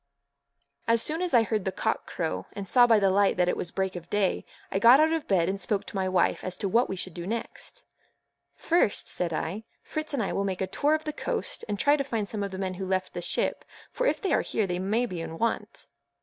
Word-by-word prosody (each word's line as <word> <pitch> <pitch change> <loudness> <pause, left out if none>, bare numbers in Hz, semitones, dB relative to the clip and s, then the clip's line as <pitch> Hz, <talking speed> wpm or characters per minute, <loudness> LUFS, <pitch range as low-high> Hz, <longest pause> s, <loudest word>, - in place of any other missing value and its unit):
As 230 0 +4
soon 320 +3 0
as 360 -1 0
I 235 -2 +5
heard 215 -2 -1
the 190 - -1
cock - - -2
crow, 90 0 -3
and 200 -1 -6
saw 245 +4 +6
by 225 -2 +6
the 195 -2 +3
light 200 0 +3
that 180 -1 +3
it - - +1
was 175 - -3
break 190 0 -2
of 175 -1 -8
day, 205 -2 0 0.3
I 195 - 0
got 235 +6 +8
out 315 +1 +4
of 325 -2 -2
bed 175 -4 +2
and 195 +1 -2
spoke 205 -2 -1
to - - -9
my 190 -1 0
wife 185 - +1
as 185 -1 -3
to 200 - -2
what 235 +6 +2
we 190 - -2
should 185 -1 -4
do 175 +1 -6
next. 235 - -5 0.7
"First," 335 -11 +1
said 175 -2 -2
I, 170 +6 -3 0.2
"Fritz 310 0 -4
and 275 -6 0
I 195 - -2
will 200 - 0
make 190 -2 -2
a - - +2
tour 290 +11 +1
of 310 - -4
the 305 - -4
coast - - -3
and 205 - -1
try 290 +7 +4
to 275 - 0
find 225 -6 -2
some 210 0 -4
of 200 - -2
the 190 - -7
men 190 -1 -2
who 190 +1 -5
left 185 0 -1
the - - -4
ship, - - -1 0.3
for - - 0
if - - +1
they 385 - 0
are - - +3
here 220 - -1
they 180 -1 -2
may 215 +6 +1
be 180 -7 -5
in 165 0 -6
want." 230 +4 -2
200 Hz, 265 wpm, -27 LUFS, 185-240 Hz, 0.7 s, got